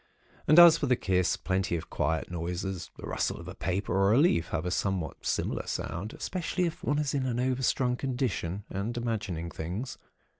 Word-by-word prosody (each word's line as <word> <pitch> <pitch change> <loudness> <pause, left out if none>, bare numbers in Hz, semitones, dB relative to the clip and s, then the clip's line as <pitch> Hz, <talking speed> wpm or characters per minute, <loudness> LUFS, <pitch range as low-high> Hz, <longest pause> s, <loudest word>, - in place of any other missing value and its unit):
And 155 - +6
as 175 -2 +10
for 145 - 0
the 125 - +4
kiss, 90 -5 +1
plenty 95 -1 -1
of 80 -1 -6
quiet 80 +4 -1
noises—the 90 +2 -4
rustle - - -1
of - - -10
a - - -6
paper 95 0 -2
or 100 +2 +4
a - - +5
leaf 145 - +3
— - - -15
have 85 0 -2
a 90 - -1
somewhat 95 -5 -2
similar - - -1
sound, 95 +7 -4
especially 180 0 -2
if 165 - -4
one 145 - +1
is 150 -1 0
in 135 -2 0
an 120 -1 -1
overstrung 125 0 +1
condition, 120 -8 -2
and 105 +5 -3
imagining 105 -8 -3
things. 95 +11 -5
100 Hz, 190 wpm, -29 LUFS, 90-130 Hz, -, as